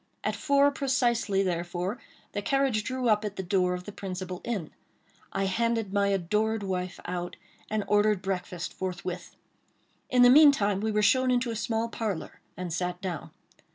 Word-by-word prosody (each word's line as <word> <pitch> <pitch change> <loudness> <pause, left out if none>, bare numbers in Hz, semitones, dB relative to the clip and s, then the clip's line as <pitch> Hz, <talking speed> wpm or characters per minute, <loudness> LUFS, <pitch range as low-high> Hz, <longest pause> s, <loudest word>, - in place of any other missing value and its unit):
At - - 0
four 280 0 +3
precisely, 240 -7 +1
therefore, 175 +3 -2 0.3
the 205 - -3
carriage 270 -3 +1
drew 255 +1 -2
up 215 -1 +3
at 205 -2 -4
the 190 - -4
door 180 0 +1
of 180 - -7
the 205 - -8
principal 185 -2 -6
inn. 210 -10 -3 0.6
I 195 - -1
handed 225 +1 0
my 200 -1 +3
adored 210 +3 0
wife 185 -2 -3
out, 175 0 -4 0.3
and 215 -1 0
ordered 210 -2 +3
breakfast 180 -2 -3
forthwith. 180 -1 -5 0.7
In 250 -1 +5
the 245 - +8
meantime 265 -9 +6
we 220 0 0
were 210 0 +1
shown 255 +5 +4
into 245 -1 +1
a - - -4
small 225 +1 -1
parlor, 215 -7 -4 0.2
and 180 -2 -4
sat 180 +1 -2
down. 180 -4 -5
205 Hz, 165 wpm, -28 LUFS, 180-230 Hz, 0.7 s, the